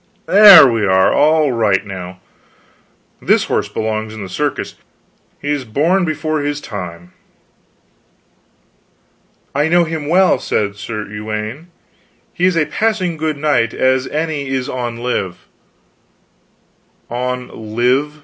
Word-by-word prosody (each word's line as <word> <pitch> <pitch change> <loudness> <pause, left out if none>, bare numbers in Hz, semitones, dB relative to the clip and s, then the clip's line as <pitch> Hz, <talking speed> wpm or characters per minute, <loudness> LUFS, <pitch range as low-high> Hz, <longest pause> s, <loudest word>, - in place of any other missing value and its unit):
There, 200 -6 +9
we 115 -3 0
are 95 -1 +3
all 155 -1 +3
right 105 -5 +1
now. 95 -1 -8 1.0
This - - +2
horse - - -2
belongs 110 0 -3
in 105 - -7
the 95 - -8
circus; - - -3 0.7
he 145 - -3
is 145 -2 -2
born 160 - +1
before 155 -1 -2
his 145 0 -2
time." 90 -7 -8 2.4
"I 145 +2 +1
know 175 +1 +3
him 160 -3 -4
well, 185 +4 +3
said 100 -1 -2
Sir 105 +1 -6
Uwaine, 110 - -6 0.7
he 180 - 0
is 185 -2 +2
a 155 - +2
passing 185 +1 -1
good 155 -1 -3
knight 140 -6 0
as 130 0 +1
any 155 -2 -3
is 130 0 -2
on 120 -4 -4
live." 115 -7 -4 1.6
"On 125 -3 -5
live. 135 +6 +1
130 Hz, 125 wpm, -16 LUFS, 110-155 Hz, 2.4 s, There